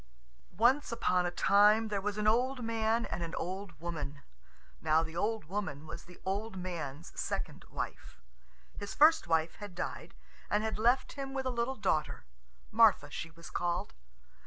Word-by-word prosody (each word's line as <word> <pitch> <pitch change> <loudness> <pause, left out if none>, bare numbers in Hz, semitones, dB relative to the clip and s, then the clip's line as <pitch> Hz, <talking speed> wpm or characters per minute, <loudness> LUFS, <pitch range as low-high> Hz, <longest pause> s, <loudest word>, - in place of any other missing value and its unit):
Once 250 +6 +4
upon 180 -6 +2
a - - +1
time 210 +4 +5
there 200 -2 -1
were 205 - 0
an 210 - -1
old 250 +4 +2
man 225 +1 +1
and - - -4
an 170 +1 -4
old 185 -2 -5
woman. 145 -4 -5 0.6
Now 160 +1 +3
the 160 0 -7
old 215 +1 -1
woman 160 -5 -4
was 170 - -8
the 180 0 -15
old 195 +2 -2
man's 170 -5 -5
second - - -4
wife. - - -6 0.6
His 205 -1 -5
first 315 +2 +6
wife 160 0 +1
had 205 -4 -8
died, - - -5 0.3
and 210 +1 +2
had 220 -1 -2
left 240 +4 +3
him 275 -1 -6
with 265 -1 -2
a 255 - 0
little 240 +2 -1
daughter: 170 - -1 0.5
Martha - - +5
she 165 - -5
was 170 +1 -12
called. 175 +3 -1
200 Hz, 165 wpm, -32 LUFS, 170-225 Hz, 0.6 s, first